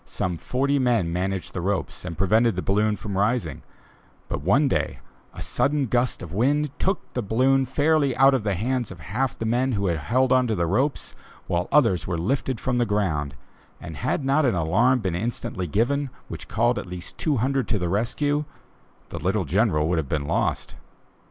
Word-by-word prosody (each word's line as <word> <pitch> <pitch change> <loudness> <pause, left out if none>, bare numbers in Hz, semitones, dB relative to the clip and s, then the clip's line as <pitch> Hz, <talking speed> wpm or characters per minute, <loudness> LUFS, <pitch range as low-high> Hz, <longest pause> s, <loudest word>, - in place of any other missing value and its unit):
Some 90 -2 -3
forty 140 +2 0
men 115 -10 +1
managed 95 +1 -2
the 90 - -3
ropes 95 +2 -2
and 85 -3 -5
prevented 110 +3 +3
the 90 - -3
balloon 105 +2 +2
from 100 -1 -6
rising; 115 +4 0 0.7
but, - - -2
one 120 - +3
day, - - -1 0.3
a - - -7
sudden 145 0 +1
gust 120 -1 0
of 85 -1 -8
wind 145 +7 +1
took 190 +2 -1
the 125 - -1
balloon 130 +5 +2
fairly 145 0 +2
out 135 +1 +6
of 130 - +1
the 105 -2 -1
hands 120 +4 -1
of 95 - -10
half 115 - -2
the 115 - -4
men 125 +3 +1
who 100 -2 -1
had 85 -4 0
hold 130 +2 +3
of 125 -5 +2
the 85 - +1
ropes, 130 - 0 0.3
while 85 0 -1
others 115 - +3
were 90 -2 -1
lifted 130 +6 -1
from 125 -2 -1
the 120 - +3
ground, 80 -9 -1 0.4
and 80 -3 -8
had 130 +3 -1
not 140 +3 +3
an 125 -7 +2
alarm 110 +10 +2
been 95 -4 -1
instantly 95 -2 -3
given 130 - 0 0.2
which - - -7
called 120 +3 +1
at - - -7
least 90 0 -8
two 150 -4 +1
hundred 130 +1 0
to 110 - +1
the 90 -2 -1
rescue 145 - 0 0.6
the - - -6
little 95 +5 0
General 85 - +2
would 85 -1 +1
have 70 -4 -4
been 75 -2 -1
lost. - - -1
110 Hz, 195 wpm, -24 LUFS, 90-130 Hz, 0.7 s, out